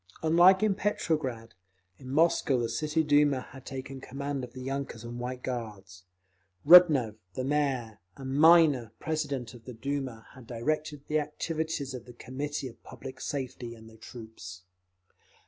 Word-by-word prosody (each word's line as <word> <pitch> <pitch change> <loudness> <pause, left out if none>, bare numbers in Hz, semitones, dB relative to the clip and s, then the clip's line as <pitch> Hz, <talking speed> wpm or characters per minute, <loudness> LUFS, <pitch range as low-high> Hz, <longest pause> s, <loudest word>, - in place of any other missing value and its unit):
Unlike 175 +5 +6
in 215 -2 +3
Petrograd, 150 - -2 0.5
in 130 - -10
Moscow 145 -2 +3
the 115 -1 -1
City 150 +7 0
Duma 145 -3 +3
had 135 -1 -12
taken 135 0 -7
command 140 0 -4
of 125 - -8
the 130 - -8
yunkers 135 -4 -4
and 120 +1 -7
White 125 +1 -5
Guards. 100 -7 -6 0.6
Rudnev, 150 -10 +7 0.2
the 130 - -2
Mayor, 130 -6 -1 0.2
and 135 -1 -5
Minor, 150 -7 +5
president 140 -6 -3
of 120 -2 -14
the 125 - -8
Duma, 130 -2 -4
had 130 -3 -14
directed 150 +4 -2
the 155 0 +1
activities 150 -2 -3
of 125 -2 -7
the 120 - -12
Committee 140 +4 -5
of 115 - -13
Public 130 0 -10
Safety 125 -4 -5
and 110 -1 -14
the 115 - -15
troops. 110 -6 -10
135 Hz, 150 wpm, -29 LUFS, 120-150 Hz, 0.6 s, Rudnev